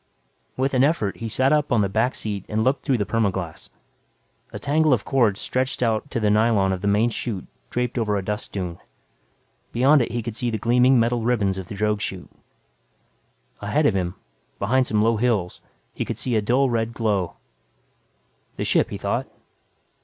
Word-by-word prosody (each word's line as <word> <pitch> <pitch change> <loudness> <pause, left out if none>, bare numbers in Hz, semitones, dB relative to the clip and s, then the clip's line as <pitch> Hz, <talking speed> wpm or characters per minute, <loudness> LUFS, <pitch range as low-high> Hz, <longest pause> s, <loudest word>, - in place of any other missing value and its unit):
With 135 +2 0
an 130 0 +4
effort 140 -10 +1
he 115 - -5
sat 130 +6 +2
up 150 -1 +1
on 120 -3 +4
the 110 +5 +1
seat 100 -3 -5
back - - -32
and 110 +1 +1
looked 130 +4 +1
through 135 -4 +1
the 105 - -1
perma 105 0 +1
glas. 85 -4 -6 0.8
A - - -6
tangle 155 0 +2
of 115 - 0
cords 115 -7 +2
stretched 130 0 -1
out 110 -2 0
to - - -2
the 105 -2 +2
nylon 105 -3 +3
of 90 - -4
the 100 - -2
main 105 +4 +3
chute 110 -5 -4 0.2
draped 125 0 -1
over 105 -2 0
a 95 - -4
dust 105 +2 -4
dune. 90 -4 -4 0.9
Beyond 135 +4 +4
it 120 - -2
he 120 -1 -2
could 115 -1 -5
see 120 +1 -1
the 110 - -1
gleaming 125 +3 +4
metal 120 +1 +1
ribbons 105 -5 +1
of 95 - -7
the 100 - -7
drogue 105 0 0
chute. 95 -3 -5 1.3
Ahead - - 0
of - - +4
him, 90 -1 -1 0.4
behind 130 +5 +1
some 105 -1 +2
low 115 0 +2
hills, 105 -6 0 0.3
he - - -3
could 115 - -5
see 120 0 -1
a 110 - +3
dull 125 +6 +2
red 115 -1 -1
glow. 105 -6 0 1.2
The - - -3
ship, - - +2
he - - -5
thought. - - -2
115 Hz, 195 wpm, -23 LUFS, 100-125 Hz, 1.3 s, an